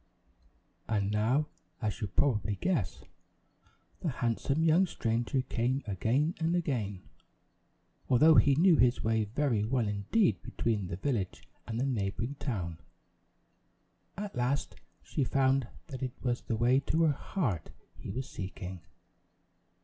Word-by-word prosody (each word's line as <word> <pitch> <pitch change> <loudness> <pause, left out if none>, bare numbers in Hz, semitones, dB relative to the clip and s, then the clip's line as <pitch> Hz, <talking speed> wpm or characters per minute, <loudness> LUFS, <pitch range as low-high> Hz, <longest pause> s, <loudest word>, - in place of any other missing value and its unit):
And 100 -2 +1
now, 115 +8 +2 0.3
as 110 0 -3
you 105 - -1
probably 105 0 +1
guess, 105 - -1 1.0
the 170 - -1
handsome 130 +4 0
young 165 +4 +5
stranger 120 -1 -1
came 125 +3 -1
again 115 - +1
and 165 +1 +1
again, 115 - -2 1.1
although 155 +6 +7
he 140 -2 +6
knew 170 +2 +5
his 125 0 +3
way 110 -1 +2
very 115 -1 0
well 120 0 +1
indeed 105 - +1
between 105 -5 -1
the 90 - -4
village 100 -2 -2 0.2
and 115 +1 -3
the 130 - +1
neighboring 115 0 -1
town. 90 - -3 1.4
At 205 0 -5
last 125 +3 0 0.3
she 145 - -1
found 135 -1 +2 0.2
that 130 -3 -6
it 130 -2 -3
was 120 -1 0
the 115 - -2
way 125 +4 +4
to 160 +4 +1
her 155 -2 +4
heart 130 - -2 0.3
he - - -9
was 130 +1 -4
seeking. 95 -3 -6
120 Hz, 135 wpm, -31 LUFS, 105-140 Hz, 1.4 s, although